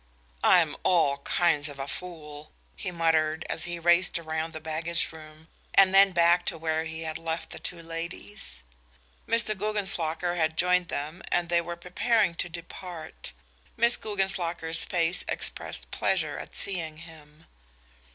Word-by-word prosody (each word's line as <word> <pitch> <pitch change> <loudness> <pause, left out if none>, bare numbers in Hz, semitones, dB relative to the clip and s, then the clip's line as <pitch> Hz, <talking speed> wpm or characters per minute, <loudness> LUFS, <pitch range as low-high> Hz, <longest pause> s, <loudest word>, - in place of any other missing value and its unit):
"I'm 165 -4 +5
all 145 -6 +3
kinds 150 0 +2
of 145 - -9
a 135 0 -4
fool," 150 -3 -8 0.2
he 190 - -4
muttered, 160 -2 +1
as - - 0
he 175 0 -4
raced 175 +2 +3
around 160 0 -3
the 155 - -6
baggage 160 +2 -1
room 155 0 -13 0.3
and 195 -1 +7
then 195 0 +7
back 170 0 +4
to 170 - -1
where 160 0 -1
he 160 0 -5
had 160 -1 -4
left 165 0 -4
the - - -7
two 170 -2 -4
ladies. 165 - -6 0.6
Mr. 230 -2 +2
Guggenslocker 180 -5 -1
had 160 -1 +1
joined 180 0 +3
them 155 +5 -4
and 175 -1 +1
they 170 0 +3
were 170 0 -5
preparing 180 +3 +1
to 175 - -3
depart. 170 -1 -8 0.5
Miss 235 +1 +4
Guggenslocker's 175 -5 -1
face 175 0 +1
expressed - - -2
pleasure - - 0
at - - -9
seeing 165 -5 -1
him. 160 -1 -15
170 Hz, 150 wpm, -28 LUFS, 160-180 Hz, 0.6 s, and